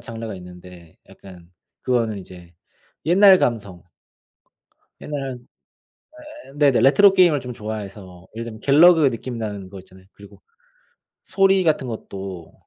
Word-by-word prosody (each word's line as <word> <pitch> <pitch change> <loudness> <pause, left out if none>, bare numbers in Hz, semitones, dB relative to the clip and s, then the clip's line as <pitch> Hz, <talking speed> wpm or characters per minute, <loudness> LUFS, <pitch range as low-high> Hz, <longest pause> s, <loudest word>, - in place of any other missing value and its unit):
장르가 115 -4 -8
있는데 90 -2 -14
약간 90 -3 -16 0.3
그거는 115 -5 -1
이제 90 -2 -14 0.5
옛날 190 +3 +6
감성. 100 -8 -3 1.2
옛날에 140 -3 -5 1.1
예예 135 - -16
네네 140 -4 +3
레트로 195 +8 +5
게임을 175 -6 +3
좀 125 -1 -8
좋아해서 100 -4 -9
예를 115 - -5
들면 110 -2 -9
갤러그 155 +1 +5
느낌 120 0 -7
나는 105 -4 -6
거 95 0 -11
있잖아요. 95 0 -18
그리고 100 0 -17 0.8
소리 195 -1 +2
같은 155 -5 0
것도 95 -6 -8
110 Hz, 285 characters per minute, -21 LUFS, 95-140 Hz, 1.2 s, 옛날